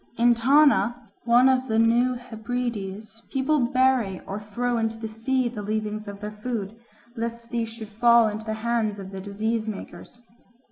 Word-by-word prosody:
In 240 +1 +5
Tana, 240 -3 +3
one 240 +2 +6
of 260 0 +2
the 220 - 0
New 235 +3 +3
Hebrides, 225 -3 -5
people 290 +3 +1
bury 250 -5 +2
or 195 +2 -5
throw 235 +3 -2
into 225 0 -1
the 225 0 -5
sea 240 +4 -1
the 230 -3 -5
leavings 215 0 -3
of 200 0 -8
their 210 0 -5
food, 210 -1 -4 0.4
lest 230 0 -5
these 230 -2 -1
should 225 -2 -9
fall 235 +1 +5
into 215 +1 -4
the 220 -1 -2
hands 225 -3 0
of 195 -1 -8
the 190 -1 -6
disease 220 +3 -2
makers. 215 +3 -8
225 Hz, 170 wpm, -25 LUFS, 215-245 Hz, 0.4 s, one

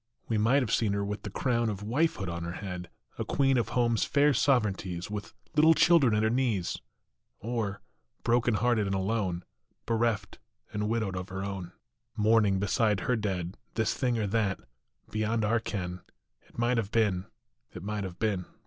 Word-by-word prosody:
We 110 -2 +1
might 125 +6 +4
have 115 - -2
seen 105 -3 +2
her 100 0 -1
with 105 +1 -4
the 105 - -6
crown 120 +1 0
Of 105 -1 -4
wifehood 120 - 0
on 85 0 -4
her 85 +1 -4
head, 90 -3 -6 0.3
A - - +1
queen 135 -1 +2
of 115 - -1
home 120 -1 +2
s 110 - +2
fair 145 0 +3
sovereignties, 100 -10 +1
With 105 -1 -5 0.2
little 160 +2 +6
children 150 -12 +5
at 105 - +2
her 110 - +3
knees; 115 -8 0 0.6
Or, 110 -3 -3 0.4
broken 120 -1 +2
hearted 115 -2 +2
and 95 - 0
alone, 95 -3 -1 0.4
Bereft 115 -2 0 0.3
and 105 0 -1
widowed 110 -4 -1
of 90 +1 -5
her 95 +1 -4
own, 95 -3 -5 0.4
Mourning 105 -2 +4
beside 100 0 +1
her 125 - +1
dead, 95 -4 -3 0.2
This 110 -1 +1
thing 125 -3 0
or 110 - 0
that, 100 -2 0 0.5
beyond 110 +1 0
our 115 +3 +2
ken, 90 -5 -4 0.5
It - - -21
might 120 +1 +2
have 110 -4 -1
been, 100 -5 +1 0.4
it 90 - -9
might 105 0 -2
have 90 -2 -6
been. 100 -5 -1
105 Hz, 180 wpm, -29 LUFS, 95-115 Hz, 0.6 s, little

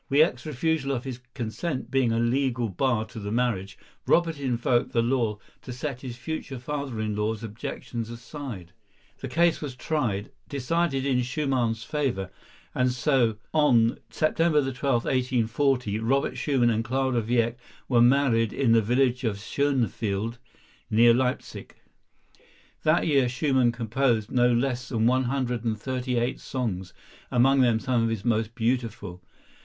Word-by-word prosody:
Wieck's 145 -1 +3
refusal 150 0 0
of 125 -2 -3
his 130 -3 -6 0.2
consent 130 +5 -4
being 135 -4 +2
a 115 - +1
legal 120 0 +1
bar 110 +3 0
to 110 0 -9
the 100 0 -5
marriage, 110 -5 -1 0.3
Robert 165 -3 +2
invoked 120 -2 0
the 115 - +3
law 115 -4 0 0.2
to 130 - -8
set 125 0 -5
his 125 -3 -7
future 140 0 -5
father 140 -2 -4
in 110 -1 -2
law's 105 +1 -2
objections 115 +1 -5
aside. 115 - -8 0.5
The - - -5
case 170 0 +2
was 140 -4 -5
tried, 120 -9 -2 0.2
decided 140 0 0
in 130 -2 +2
Schumann's 125 -4 -1
favor, 130 -11 -2 0.4
and 125 - +2 0.7
on 120 -7 +3
September 155 0 +2
12, 125 -2 0
1840, 125 -2 +1
Robert 135 +5 0
Schumann 130 -5 +2
and 110 0 0
Clara 130 0 0
Wieck 120 +1 0 0.3
were 120 -3 +4
married 120 -3 +4
in 130 -4 +1
the 115 0 +5
village 125 +3 +1
of 110 -4 -1
Schönefeld, 115 -3 -1 0.5
near 115 +2 +6
Leipsic. 125 +1 -2 1.1
That 155 +2 +3
year 140 -5 +3
Schumann 130 -2 +2
composed 115 -1 0
no 125 0 +4
less 125 +1 0
than 115 -3 0
one 130 +2 +3
hundred 125 -2 -1
and 110 -2 -1
thirty 125 0 -2
eight 120 +1 -1
songs, 95 -9 -4 0.4
among 135 +2 +4
them 120 -3 +3
some 125 0 0
of 115 - +1
his 110 -3 -3
most 115 -1 0
beautiful. 115 -6 -2
125 Hz, 145 wpm, -26 LUFS, 115-135 Hz, 1.1 s, near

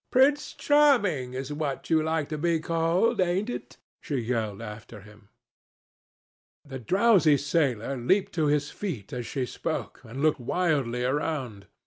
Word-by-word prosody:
"Prince 280 +3 +3
Charming 210 - +3
is 135 +2 -4
what 145 0 -4
you 160 -1 +4
like 160 -1 -1
to 155 - -3
be 170 +1 +1
called, 165 +8 +1
ain't 185 +6 0
it?" 130 - -8 0.2
she 145 - -4
yelled 115 -5 -2
after 105 -1 -9
him. 105 0 -17 1.4
The 135 -2 -7
drowsy 180 - +4
sailor 140 -4 0
leaped 185 +11 +1
to 160 -3 +1
his 145 0 +1
feet 145 - -6
as 120 -2 -4
she 135 -3 -2
spoke, - - -5
and 115 +4 -9
looked 155 0 +2
wildly 130 -4 0
round. 130 -7 -2
145 Hz, 145 wpm, -27 LUFS, 125-170 Hz, 1.4 s, you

